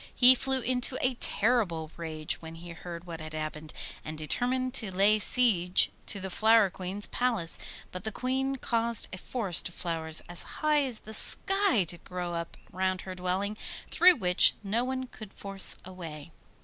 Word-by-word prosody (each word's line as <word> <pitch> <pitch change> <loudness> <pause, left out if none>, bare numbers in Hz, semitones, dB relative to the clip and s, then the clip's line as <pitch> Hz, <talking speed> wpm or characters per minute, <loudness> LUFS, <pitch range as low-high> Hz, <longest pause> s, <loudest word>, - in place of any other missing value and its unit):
He 250 +1 +9
flew 265 0 0
into 250 +1 +1
a 255 - 0
terrible 205 -10 0
rage 155 -2 -3
when 160 0 -10
he 170 +1 -11
heard 170 0 -9
what 165 -2 -9
had 155 0 -9
happened, 155 0 -6 0.3
and 155 0 -7
determined 250 +11 -2
to 225 -6 0
lay 200 +3 +3
siege 195 -7 +4 0.2
to 200 - -2
the 190 0 -6
Flower 220 -1 +3
Queen's 190 +3 -4
palace; 230 -10 -2 0.3
but 180 0 -7
the 220 - -3
Queen 265 +3 -2
caused 235 -3 0
a 190 - -6
forest 195 -7 0
of 170 - -16
flowers 160 -2 +4
as 175 -1 -1
high 300 -1 0
as 245 -4 -4
the 220 - -11
sky 390 - +2
to 175 0 -6
grow 180 -1 -6
up 170 0 -6
round 185 +1 -2
her 185 - -8
dwelling, 185 +3 -3 0.3
through 360 0 +6
which 180 - +3
no 215 +4 -1
one 260 0 -4
could 215 -5 -12
force 195 -1 0
a 185 - -10
way. 165 -3 -9
195 Hz, 175 wpm, -28 LUFS, 170-245 Hz, 0.3 s, He